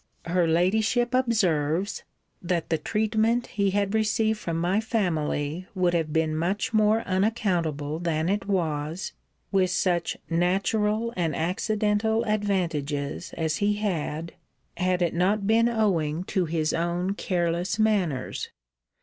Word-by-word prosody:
Her 175 0 +2
ladyship 220 +8 +2
observes, 190 - +1 0.4
'That 175 -2 -1
the 160 - +2
treatment 220 +6 +1
he 200 -1 0
had 200 +1 0
received 220 0 +1
from 165 -4 -3
my 175 +5 +1
family 170 -6 -1
would 180 -2 +2
have 165 -3 0
been 160 0 +1
much 180 +8 -1
more 215 +1 +4
unaccountable 180 -7 0
than 165 -2 -1
it 200 +1 -1
was, 160 -3 -1 0.4
with 190 -2 +3
such 175 -2 0
natural 210 +7 +1
and 165 -5 -1
accidental 210 +5 0
advantages 170 -10 -1
as 160 -1 0
he 205 0 +1
had, 170 -5 -3 0.4
had 180 0 +1
it 170 - 0
not 195 +4 +1
been 230 +3 +4
owing 180 -8 +1
to 185 -1 0
his 155 -1 -1
own 175 +3 0
careless 175 -1 -1
manners. 195 -12 0
185 Hz, 125 wpm, -26 LUFS, 165-210 Hz, 0.4 s, more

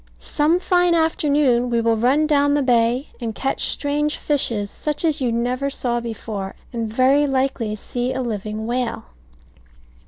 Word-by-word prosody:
Some 300 - +1
fine 355 -2 +2
afternoon 290 -6 +2
we 235 -1 +1
will 230 0 +2
run 260 +7 +2
down 285 -1 +3
the 290 - +1
bay 245 +2 +2
and 225 -2 -4
catch 270 - -1
strange 295 +1 0
fishes, 230 -8 0
such 300 +2 -3
as 310 -2 +1
you 245 -2 +1
never 250 +4 -1
saw 240 -3 -1
before, 220 -4 -6 0.2
and 225 -2 -3
very 270 +5 +3
likely 260 -5 -1
see 245 +4 -3
a 260 0 -2
living 215 -1 -4
whale. 240 - -2
255 Hz, 155 wpm, -21 LUFS, 230-290 Hz, 0.2 s, down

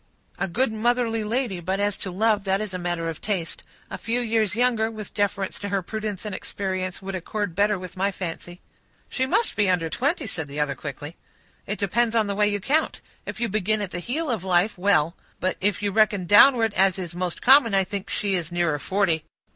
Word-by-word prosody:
"A 195 - 0
good 230 +7 +1
motherly 225 0 0
lady, 225 -3 -1
but 190 +3 -2
as 205 -1 +1
to 195 - -4
love, 210 +2 +1
that 195 0 +1
is 210 -3 -4
a 180 - -3
matter 175 -1 -2
of 165 -1 -5
taste. 190 -6 -3 0.3
A - - -5
few 235 +2 0
years 220 -4 +1
younger, 235 -2 +2
with 215 -3 -9
deference 200 -2 -1
to 200 - -4
her 200 -2 0
prudence 215 0 -5
and 210 - -4
experience, 185 -1 -4
would 195 0 -5
accord 195 +1 -3
better 205 +2 +2
with 185 0 -9
my 195 +2 +1
fancy." 175 -1 -6 0.5
"She 260 0 -1
must 455 - +1
be 205 -3 +2
under 165 -3 +1
twenty," 285 +7 0
said 160 -8 -4
the 140 +1 -6
other, 150 -1 +1
quickly. 145 +3 -7 0.5
"It 205 - -2
depends 230 +4 +1
on 225 -2 +3
the 200 - -2
way 210 +1 +2
you 205 0 -1
count. 285 +10 0 0.3
If - - -5
you 235 - +1
begin 215 +1 0
at 200 -3 -4
the 175 - -3
heel 270 - -2
of 220 -6 -2
life, 185 +3 +2
well; 180 -4 +2 0.2
but 185 - 0
if 205 +1 0
you 205 - +1
reckon 210 -2 +2
downward, 225 +3 +6
as 195 -1 +3
is 175 -3 -5
most 180 -1 -3
common, 260 -5 +6
I 195 - +4
think 195 +1 -6
she 200 -2 -1
is 175 -3 -2
nearer 170 -4 0
forty." 180 -3 0
200 Hz, 220 wpm, -24 LUFS, 180-220 Hz, 0.5 s, downward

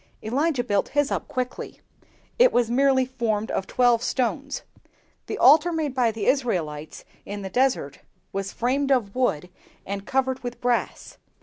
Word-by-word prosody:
Elijah 265 +4 0
built 205 -4 0
his 290 -1 +3
up - - -2
quickly; 255 -4 -5 0.6
it - - +7
was 240 -1 +1
merely 265 0 +3
formed 230 -4 -2
of 190 - -2
twelve 245 -2 +3
stones. 275 +4 -2 0.6
The - - -4
altar 335 +3 +6
made 315 -5 -2
by 250 -3 +2
the 220 -2 -4
Israelites 175 - -1 0.2
in 205 0 -6
the 190 - -6
desert 245 - 0 0.3
was 195 0 -3
framed 270 +4 0
of 225 -7 +1
wood, 180 -10 0 0.4
and 200 +1 -5
covered 260 0 0
with 245 -1 -6
brass. 245 -1 -2
245 Hz, 150 wpm, -24 LUFS, 210-270 Hz, 0.6 s, it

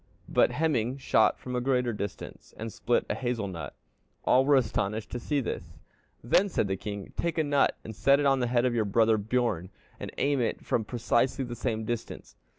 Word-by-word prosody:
But - - +3
Hemingr 135 -5 0
shot 110 -4 +3
from 125 -1 -6
a 125 - 0
greater 125 -2 +1
distance, 100 -1 -7
and 110 0 -6
split 120 - 0
a - - -1
hazel 120 -5 -2
nut. 85 -4 -7 0.5
All 130 +1 +5
were 145 0 +5
astonished 110 -3 0
to 120 - -3
see 145 +3 -1
this. - - -6 0.5
Then 185 - +3
said 110 - 0
the 95 - -1
king, 100 0 -7
'Take 170 -1 -1
a 160 - +3
nut 145 -1 +2
and 110 - -8
set 140 +6 +4
it 145 - +1
on 135 -1 +4
the 125 - +1
head 120 0 +2
of 125 - +1
your 115 -2 +1
brother 110 +2 +3
Bjorn, 105 -5 -1 0.3
and - - -5
aim 140 -1 +1
at 115 - +2
it - - -21
from 110 - 0
precisely 120 +3 0
the 120 -1 -6
same 110 -1 -2
distance. 120 0 -5
120 Hz, 210 wpm, -28 LUFS, 110-135 Hz, 0.5 s, All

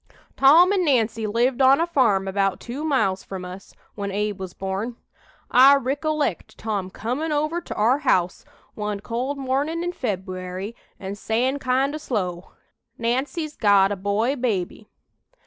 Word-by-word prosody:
"Tom 335 +8 +6
an' 380 -2 +2
Nancy 225 -7 +1
lived 240 +5 +1
on 265 +2 +6
a 335 - +2
farm 225 - +2
about 195 0 0
two 255 +5 -6
miles 260 -11 +1
from 190 -2 -7
us, 185 +2 -10 0.2
when 200 -1 -4
Abe 205 0 -2
was 185 -2 -7
born. 195 +5 -4 0.6
I 265 +3 +8
ricollect 285 - -2
Tom 205 -4 -3
comin' 255 +11 -3
over 305 +3 0
to - - -7
our 235 +6 +3
house 185 - +1 0.3
one 210 -1 -4
cold 250 +6 -3
mornin' 280 +5 -1
in 350 - -1
Feb'uary 185 - -4 0.3
an' 195 0 -5
sayin' 240 +7 -1
kind 265 +2 +1
o' 305 - -4
slow, 185 - -3 0.5
'Nancy's 275 +7 -2
got 200 -2 +4
a - - 0
boy 205 +7 0
baby.' 215 -5 -3
235 Hz, 150 wpm, -23 LUFS, 195-275 Hz, 0.6 s, I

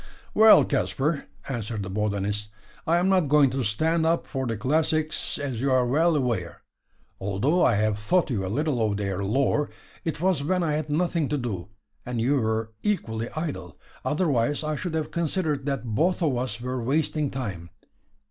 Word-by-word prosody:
"Well, 220 0 +7
Caspar," 140 +1 0 0.2
answered 115 -4 -3
the 95 - -6
botanist, 105 0 -1 0.4
"I 165 +2 +4
am 180 +2 +2
not 185 -6 +3
going 145 -2 +5
to 135 +1 -1
stand 160 +10 +1
up 165 +1 +1
for 130 -3 -3
the 115 -2 -2
classics, 155 +5 0
as 135 -5 -3
you 135 0 +1
are 130 -1 +4
well 160 +7 +3
aware. 115 - -2 0.6
Although 105 - +1
I 115 - +4
have 105 0 0
taught 180 -5 +3
you 100 -6 -1
a - - -3
little 135 +1 0
of 105 -2 0
their 100 -1 -2
lore, 140 +7 +1 0.3
it 160 -2 -3
was 180 -4 +1
when 180 +4 +1
I 155 -3 0
had 155 0 -2
nothing 165 -1 0
to 150 - 0
do, 100 -9 -4 0.4
and 125 -1 -3
you 130 +4 +2
were 110 0 -1
equally 115 - -1
idle; 155 -2 -4 0.3
otherwise 145 -4 +1
I 155 0 -1
should 165 +2 -3
have 155 -1 -2
considered 155 -4 -1
that 135 -3 -2
both 165 - +1
of 145 -6 +2
us 120 -2 -3
were 125 +1 -3
wasting 150 +3 0
time. 100 -11 -5
135 Hz, 180 wpm, -26 LUFS, 110-155 Hz, 0.6 s, Well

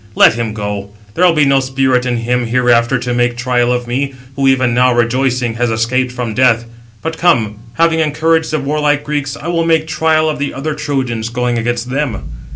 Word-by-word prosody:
Let - - +6
him 115 -1 -3
go; 105 -1 -4 0.2
there 175 - 0
will 170 - +2
be 150 -2 +4
no 135 0 +3
spirit 130 -1 0
in 120 -1 0
him 120 +1 -1
hereafter 120 +1 +2
to 125 0 -3
make 120 0 0
trial 120 0 +1
of 125 0 -1
me, 135 +3 -2 0.2
who 135 -1 +1
even 130 -2 +2
now 125 +1 +3
rejoicing, 120 0 0
has 120 0 0
escaped 120 +3 0
from 125 -3 -4
death. 115 -1 +3 0.4
But 160 +1 -4
come, 110 -11 +2
having 165 +4 +2
encouraged 160 +1 +1
the 155 - 0
warlike 145 +1 0
Greeks, 145 -2 -3
I 155 - -8
will 165 -1 +1
make 160 -1 +2
trial 160 0 +1
of 155 - -2
the 140 0 -3
other 150 +3 -3
Trojans, 130 -7 -3
going 120 0 -1
against 120 +1 -2
them." 135 -4 -2
125 Hz, 200 wpm, -15 LUFS, 120-145 Hz, 0.4 s, Let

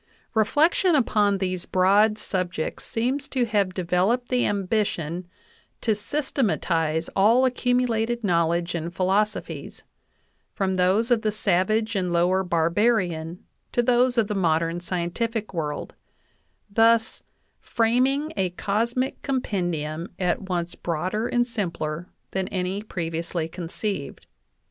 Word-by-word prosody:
Reflection 305 - +3
upon 210 -7 +2
these 185 -2 -2
broad 205 +4 +4
subjects 180 -6 -2
seems 260 +5 -1
to 255 -3 0
have 210 -3 +1
devel 185 +2 +1
oped 245 0 -2
the 250 -1 +2
ambition 185 -4 -1 0.5
to 220 - +1
systematize 200 - 0
all 225 +7 +4
accumulated 245 -2 0
knowledge 170 -2 +1
and 170 0 -4
philosophies, 195 +4 -1 0.7
from 190 -1 0
those 190 +6 +2
of 235 -2 +4
the 215 - 0
savage 215 +2 +1
and 180 -2 0
lower 175 +2 +3
barbarian 175 -1 0 0.3
to 240 - +2
those 250 +1 +3
of 225 -3 +3
the 210 - -2
modern 165 -2 +1
scientific 195 +6 -3
world, 150 -4 -3 0.7
thus 225 +2 +3 0.4
"framing 255 +6 +1
a 190 -2 0
cosmic 230 +8 -1
compendium 175 - -2
at 180 +2 0
once 175 -3 -3
broader 185 +7 -2
and 240 0 +2
simpler 175 -7 -3 0.2
than 190 -1 -1
any 185 +1 -2
previously 165 -4 -3
conceived." 175 0 -5
195 Hz, 115 wpm, -25 LUFS, 175-230 Hz, 0.7 s, broad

